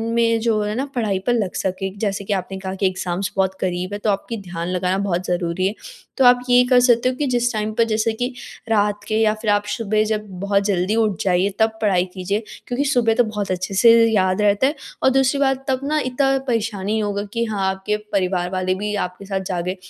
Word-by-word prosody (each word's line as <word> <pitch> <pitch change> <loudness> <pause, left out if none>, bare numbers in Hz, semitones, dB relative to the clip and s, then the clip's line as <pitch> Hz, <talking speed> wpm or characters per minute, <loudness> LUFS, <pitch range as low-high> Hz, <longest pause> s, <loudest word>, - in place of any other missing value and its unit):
में 230 -1 +3
जो 220 -2 +1
है 210 +1 -2
ना, 265 +3 -1
पढ़ाई 210 -6 0
पर 245 - +4
लग 210 -6 -1
सके। 190 +1 -2
जैसे 200 -2 -2
कि 205 - -1
आपने 190 0 -3
कहा 190 -1 -5
कि 195 0 +1
एग्ज़ाम्स 185 0 -3
बहुत 190 0 +1
क़रीब 180 +1 -2
हैं, 205 - -3
तो 215 - +1
आपकी 205 +4 -3
ध्यान 175 -2 -5
लगाना 180 +1 0
बहुत 185 -2 -1
ज़रूरी 175 0 -1
है। 200 - -2 0.4
तो 265 - +4
आप 245 0 +7
ये 245 0 +6
कर 250 -1 +6
सकते 245 0 +4
हो 255 - -3
कि 290 - -1
जिस 245 -1 +1
टाइम 215 0 -2
पर 230 - +3
जैसे 220 +1 +1
कि 245 +3 -3 0.4
रात 205 -2 +1
के 215 - -1
या 215 -1 +3
फिर 220 - -1
आप 205 0 +2
सुबह 215 -1 +1
जब 215 -1 -2
बहुत 200 +1 +1
जल्दी 195 +1 +1
उठ 215 -6 +1
जाइए, 185 +1 +2
तब 220 0 +2
पढ़ाई 190 -4 +2
कीजिए 200 +4 -2 0.2
क्योंकि 255 +3 -1
सुबह 245 -5 +2
तो 245 - +4
बहुत 210 -3 -3
अच्छे 185 +2 -3
से 230 +4 +6 0.2
याद 185 -1 +2
रहता 205 +5 +3
है, 290 - -1 0.3
और - - +6
दूसरी 270 +1 +2
बात 270 -1 +1
तब 260 -1 +1
ना 305 +2 0
इतना 270 +1 +1
परेशानी 220 -3 -1
इ - - 0
होगा 205 -1 -2
कि 235 0 0
हाँ, 200 -4 -1
आपके 190 +2 -2 0.2
परिवार 180 -2 0
वाले 185 0 0
भी 210 +2 -3
आपके 180 +2 -10
साथ 195 -1 -2
जागें। 180 +1 -2
205 Hz, 230 wpm, -21 LUFS, 190-230 Hz, 0.4 s, आप